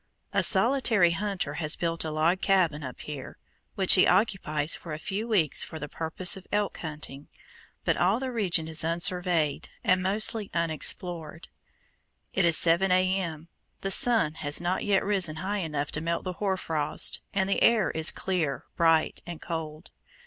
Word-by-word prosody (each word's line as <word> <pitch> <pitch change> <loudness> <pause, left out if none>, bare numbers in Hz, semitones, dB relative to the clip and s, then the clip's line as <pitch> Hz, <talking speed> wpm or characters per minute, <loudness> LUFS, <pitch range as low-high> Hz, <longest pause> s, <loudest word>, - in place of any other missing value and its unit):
A - - +3
solitary 225 -10 +3
hunter 190 -4 -2
has 155 -1 0
built 165 -1 -2
a 160 - -3
log 160 +4 +1
cabin 175 -6 +2
up 130 -3 -8
here, 145 -3 -8 0.4
which 190 -2 +6
he 185 - +5
occupies 175 -6 +1
for 160 - -6
a - - -4
few 200 +7 -4
weeks 185 - +2
for 160 - -7
the 150 - -6
purpose 165 +4 0
of 190 -1 -12
elk 205 -1 -1
hunting, 150 -3 -7 0.6
but - - +1
all 190 +8 +2
the 260 -1 -4
region 180 -8 +2
is 160 -1 -2
unsurveyed, 170 -2 0
and 185 0 +2
mostly 205 +2 -1
unexplored. 170 0 -2 0.8
It 190 - +2
is 165 -1 +4
7 175 +3 +3
A.M. 185 -3 0 0.3
The 195 - -2
sun 220 -7 +3
has 145 0 +2
not 175 +2 -1
yet 200 -2 +1
risen 190 -6 +1
high 195 +6 -3
enough 150 -5 -3
to 150 - -2
melt 170 +1 -2
the 185 - -4
hoar 190 0 -1
frost, 155 -5 0
and 190 -1 0
the 195 - 0
air 230 -3 +4
is 160 0 +2
clear, 170 -7 -2
bright, 165 -1 +2
and 170 -2 -7
cold. 160 -1 -6
175 Hz, 170 wpm, -27 LUFS, 155-195 Hz, 0.8 s, which